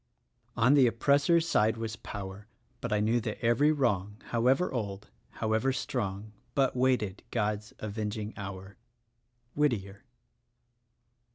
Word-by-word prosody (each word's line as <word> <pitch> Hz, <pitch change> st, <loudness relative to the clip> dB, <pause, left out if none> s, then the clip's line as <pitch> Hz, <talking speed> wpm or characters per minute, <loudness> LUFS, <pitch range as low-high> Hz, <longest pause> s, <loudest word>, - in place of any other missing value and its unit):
"On 125 Hz, +5 st, +5 dB
the 135 Hz, -4 st, +6 dB
oppressor's 140 Hz, +8 st, +3 dB
side 110 Hz, -6 st, +2 dB
was 110 Hz, -1 st, -4 dB
power; 100 Hz, 0 st, -8 dB, 0.3 s
But 120 Hz, -, -4 dB
I 105 Hz, -, +2 dB
knew 115 Hz, +3 st, +2 dB
that 110 Hz, -1 st, -4 dB
every 140 Hz, +6 st, +4 dB
wrong, 105 Hz, -9 st, 0 dB
However 130 Hz, +9 st, +2 dB
old, 105 Hz, -4 st, -4 dB, 0.2 s
however 110 Hz, +4 st, +1 dB
strong, 110 Hz, -5 st, -3 dB, 0.2 s
But 135 Hz, -2 st, +2 dB
waited 125 Hz, -6 st, +1 dB
God's 105 Hz, -2 st, -2 dB
avenging 105 Hz, 0 st, -4 dB
hour." 95 Hz, -1 st, -8 dB, 0.4 s
— 120 Hz, 0 st, -45 dB
Whittier. 105 Hz, -10 st, 0 dB
110 Hz, 120 wpm, -30 LUFS, 105-125 Hz, 0.4 s, the